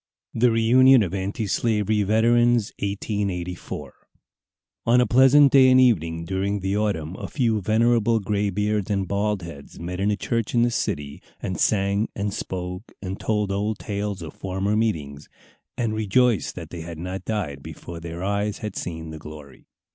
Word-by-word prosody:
THE 120 +2 +3
REUNION 125 +2 +5
OF 90 -2 -4
ANTISLAVERY 105 +2 0
VETERANS. 115 +2 +3
1884 100 -3 -4 0.9
On 120 +2 +5
a 125 - +4
pleasant 135 +3 +6
day 130 -1 +7
and 130 0 +6
evening 85 -10 +2
during 95 +2 -2
the 95 +1 -1
autumn 95 -6 -1
a - - -5
few 115 -7 0
venerable 115 +2 +2
graybeards 105 0 -1
and 100 -2 0
bald 100 -1 -1
heads 75 -5 -10
met 90 +2 -5
in 100 +2 +1
a 105 - +1
church 115 +1 -2
in 120 - +4
the 120 - +2
city, 70 -9 -3 0.2
and 90 -3 -4
sang 100 +1 +1
and 100 -1 -2
spoke, 90 +3 -5
and 95 0 -5
told 105 -2 -1
old 105 +2 -1
tales 100 -3 -4
of 80 - -8
former 95 +2 -2
meetings, 75 -10 -2 0.5
and 115 -3 -1
rejoiced 110 - +1
that - - -8
they 85 - -6
had 85 0 -7
not 90 +3 -5
died 90 -11 -3
before 85 +4 -9
their 85 +1 -7
eyes 100 +1 -1
had 105 -3 -6
seen 80 -2 -5
the 80 - -8
glory. 75 -3 -12
100 Hz, 160 wpm, -24 LUFS, 90-110 Hz, 0.9 s, day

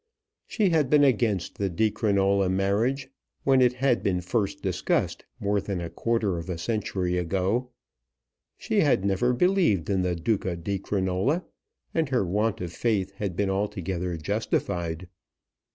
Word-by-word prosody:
She 205 -5 +1
had 155 -5 +2
been 150 0 +5
against 110 -9 +1
the 100 -1 0
Di 105 +5 +1
Crinola 100 -2 +2
marriage, 105 +8 0 0.3
when 135 -1 +4
it 125 -1 +4
had 125 -1 +1
been 90 -2 0
first 100 +1 -2
discussed 95 -2 -1
more 100 0 0
than 100 -2 -3
a 85 -1 -5
quarter 110 -6 0
of 85 - -8
a 90 - -2
century 90 -3 -1
ago. 95 +8 0 0.9
She - - 0
had 95 - +3
never 100 +5 +2
believed 125 - +2
in 95 -1 +2
the 90 -1 0
Duca 95 +1 -1
di 95 +4 -3
Crinola, 100 - 0 0.5
and 160 -4 0
her 125 -7 +1
want 105 +4 0
of 85 -2 -5
faith 100 -2 0
had 100 -4 -3
been 100 0 0
altogether 90 -3 -2
justified. 85 +2 -2
100 Hz, 150 wpm, -26 LUFS, 90-115 Hz, 0.9 s, been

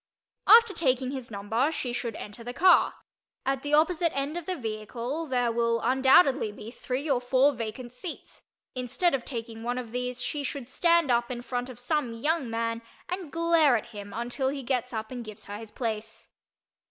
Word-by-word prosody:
After 460 -2 +8
taking 260 -5 +1
his 260 -3 -6
number 225 +7 0
she 250 -6 -3
should 235 -2 -3
enter 210 +3 -8
the 245 +1 -6
car. 370 +1 +5 0.5
At 270 0 0
the 290 +1 +2
opposite 335 +2 +3
end 280 +3 -1
of 345 -2 -5
the 370 - -1
vehicle 235 - -4
there 245 -3 +1
will 230 0 +1
undoubtedly 265 0 +4
be 210 +2 -9
three 260 +4 -4
or 265 -4 +2
four 260 +3 +4
vacant 240 0 -6
seats; 320 +7 -8 0.3
instead 255 +7 0
of 265 -3 0
taking 230 -3 -5
one 245 +2 -2
of 240 -3 -5
these 250 0 -3
she 290 +2 -2
should 275 -2 -4
stand 335 -1 +3
up 240 0 +2
in 245 -1 -5
front 245 0 -3
of 250 - -9
some 245 -1 -1
young 295 +3 0
man 230 0 -2 0.3
and 360 -4 -4
glare 330 -6 +4
at 220 - -7
him 205 -3 -8
until 245 +4 -2
he 275 0 -4
gets 250 -1 -1
up 220 -1 -4
and 245 -2 -5
gives 215 -1 -10
her 205 +1 -6
his 225 -1 -9
place. 220 -2 -5
250 Hz, 190 wpm, -28 LUFS, 230-285 Hz, 0.5 s, After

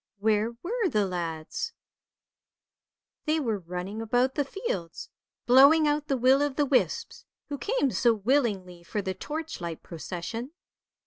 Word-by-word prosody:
where 215 +2 +1
were 435 +1 0
the 210 -7 +2
lads? 165 -4 -4 1.5
They 310 +1 +2
were 225 -8 -1
running 180 +4 -5
about 245 +4 +1
the 290 - +1
fields, 260 - -5 0.3
blowing 280 +5 +7
out 295 0 0
the 270 - +1
will 260 +3 +5
o' 290 - +2
the 290 +2 0
wisps, 265 -2 0 0.3
who 285 -1 -4
came 410 - +1
so 240 -1 +3
willingly 205 -6 0
for 205 +4 -3
the 190 -1 -2
torchlight 190 - -5
procession. 185 - -6
235 Hz, 135 wpm, -28 LUFS, 190-290 Hz, 1.5 s, blowing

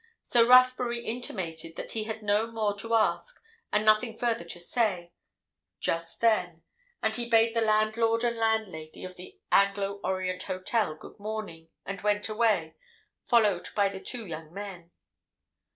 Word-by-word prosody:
So 235 -1 +4
Rathbury 250 -1 +5
intimated 170 -9 -5
that - - -4
he 220 -1 -2
had 220 0 -5
no 210 +2 +2
more 215 -3 -1
to 230 +3 0
ask, 225 - 0 0.3
and 210 +1 +1
nothing 220 +1 +3
further 235 -7 0
to 170 +1 -5
say, 175 -3 -1 0.7
just 165 0 -2
then, 180 -8 +1 0.4
and - - +1
he 235 -1 -3
bade 225 0 +4
the 230 - +2
landlord 220 +1 +2
and 235 -1 +1
landlady 220 -9 -2
of 185 0 -9
the 180 +1 -12
Anglo 200 0 +2
Orient 185 -1 -2
Hotel 185 -1 -1
good 155 - -14
morning, 205 -6 -6 0.2
and 195 0 -5
went 210 +1 0
away, 215 -7 +1 0.5
followed 210 -7 +3
by 200 -1 +3
the 195 -1 -7
two 240 -3 -5
young 160 -3 -8
men. 190 -3 -8
210 Hz, 150 wpm, -28 LUFS, 185-225 Hz, 0.7 s, Rathbury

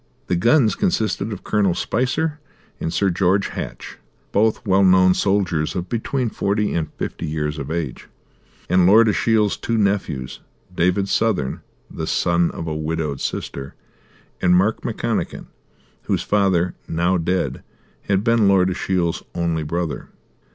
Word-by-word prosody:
The 90 - 0
guns 115 - +4
consisted 110 - -1
of 100 - -6
Col. 100 -5 +1
Spicer 145 - -1 0.4
and 80 - -2
Sir 95 +2 +1
George 95 +2 +1
Hatch, - - -7 0.3
both 110 +3 +1
well 95 -1 +3
known 95 -1 +6
soldiers 90 -6 0
of 90 -1 -3
between 120 +1 -1
forty 105 +1 0
and 80 -3 -2
fifty 85 - -5
years 75 0 -2
of 70 - -5
age, 80 -5 -4 0.6
and 90 -1 +4
Lord 110 +4 +6
Ashiel's 105 -1 +2
two 115 - -2
nephews, 100 -11 -1 0.4
David 90 +3 +1
Southern, 100 -12 0 0.3
the - - -6
son 85 -1 +2
of 80 - -6
a 80 -1 -3
widowed 75 -2 -3
sister, 70 0 -4 0.7
and 90 -1 +4
Mark 100 +5 +2
McConachan, - - -3 0.6
whose - - 0
father, 95 -4 +2
now 85 +2 +1
dead, 90 +3 -1 0.5
had 100 0 +1
been 115 -2 +3
Lord 95 -1 +4
Ashiel's 90 -2 -1
only 85 -2 0
brother. 80 +1 -3
95 Hz, 140 wpm, -21 LUFS, 85-105 Hz, 0.7 s, known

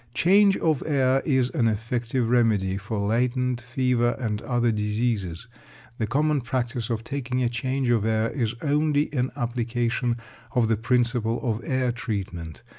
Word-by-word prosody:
Change 195 +2 +5
of 155 -4 +1
air 135 -3 +2
is 130 -3 +2
an 115 - +1
effective 115 +2 -1
remedy 110 -6 +2
for 100 0 -3
latent 125 +2 0
fever 125 -1 +1
and 110 -4 -2
other 120 -2 +1
diseases. 105 -3 -1 0.5
The 110 - 0
common 150 +4 +1
practice 120 -1 -2
of 115 -1 -2
taking 130 0 -2
a 120 - +2
change 130 +2 -1
of 115 -3 +2
air 110 +1 +1
is 120 -4 -1
only 150 0 +1
an 130 -2 0
application 120 -1 -1 0.4
of 115 -3 +3
the 115 - +3
principle 120 0 +1
of 115 -2 -1
air 130 0 0
treatment. 95 -9 -5
120 Hz, 150 wpm, -25 LUFS, 115-130 Hz, 0.5 s, Change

